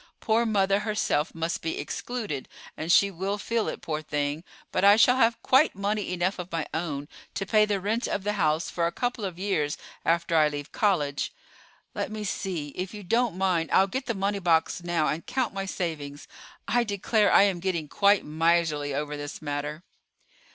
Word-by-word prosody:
Poor 230 +1 +2
mother 200 -2 +2
herself 210 -8 -1
must 165 +1 -2
be 160 - -3
excluded, 215 - -4 0.3
and 160 +2 -2
she 200 +3 +5
will 195 +3 -2
feel 230 +2 -1
it, - - -4
poor 155 -1 -2
thing; 145 +1 -2 0.3
but 185 - 0
I 200 +1 +8
shall 250 +3 +5
have 230 -2 +3
quite 270 +5 +4
money 200 0 -1
enough 180 +2 -1
of 180 0 -6
my 165 -2 -1
own 150 -3 -3 0.3
to 195 - -2
pay 215 +1 +4
the 205 -2 0
rent 220 +5 -1
of 200 - -2
the 210 +1 0
house 160 -4 +1
for 170 -1 0
a - - -2
couple 245 +3 -2
of 185 -3 -4
years 180 -7 -1 0.3
after 170 0 +1
I 155 -1 +6
leave 145 -1 -5
college. 150 -10 0 0.6
Let - - -3
me 215 0 -4
see; 180 -7 -3
if 185 +8 -5
you 205 - -8
don't 230 +1 +1
mind, 180 -4 +1
I'll 190 - +5
get 255 +7 -4
the 235 - -1
money 200 +1 -1
box 175 0 +1
now, 170 -3 +1
and 160 - -2
count 255 -5 -1
my 195 0 -3
savings. 150 -6 -4 0.4
I 245 0 +3
declare 210 0 +1
I - - +7
am 195 -3 +1
getting 170 -4 -2
quite 200 +6 +3
miserly 155 -2 +1
over 150 +1 -2
this 145 0 -6
matter." 145 +1 -4
185 Hz, 195 wpm, -27 LUFS, 155-205 Hz, 0.6 s, I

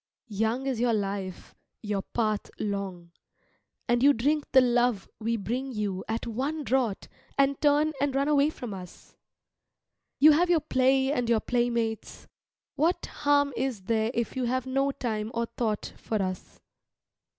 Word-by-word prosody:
Young 225 +5 0
is 260 -4 -1
your 235 -1 +2
life, 195 -2 -4 0.3
your 205 -2 -1
path 215 0 -2
long, 195 -4 -4 0.8
and 240 0 +2
you 285 +2 +6
drink 290 +5 0
the 265 - +7
love 245 -4 +2
we 230 +1 -1
bring 250 +6 -3
you 205 -5 -3
at 225 +1 -2
one 275 +7 -2
draught 245 -4 0 0.3
and 275 0 +2
turn 295 +1 +3
and 280 -2 0
run 275 +1 +1
away 295 0 +4
from 245 -8 -7
us. 180 -2 -11 1.0
You 305 +2 +8
have 345 +4 +3
your 345 -2 +4
play 265 -2 +2
and 245 -5 -1
your 230 -2 +4
playmates. 235 -2 -1 0.5
What 330 +5 +1 0.2
harm 285 -1 +3
is 250 -8 -2
there 220 +2 +1
if 235 -2 -2
you 255 -1 -1
have 255 +1 -1
no 270 +1 +1
time 220 -5 -3
or 235 0 0
thought 225 -2 -3
for 220 - -2
us. 185 -1 -4
240 Hz, 155 wpm, -27 LUFS, 215-275 Hz, 1.0 s, You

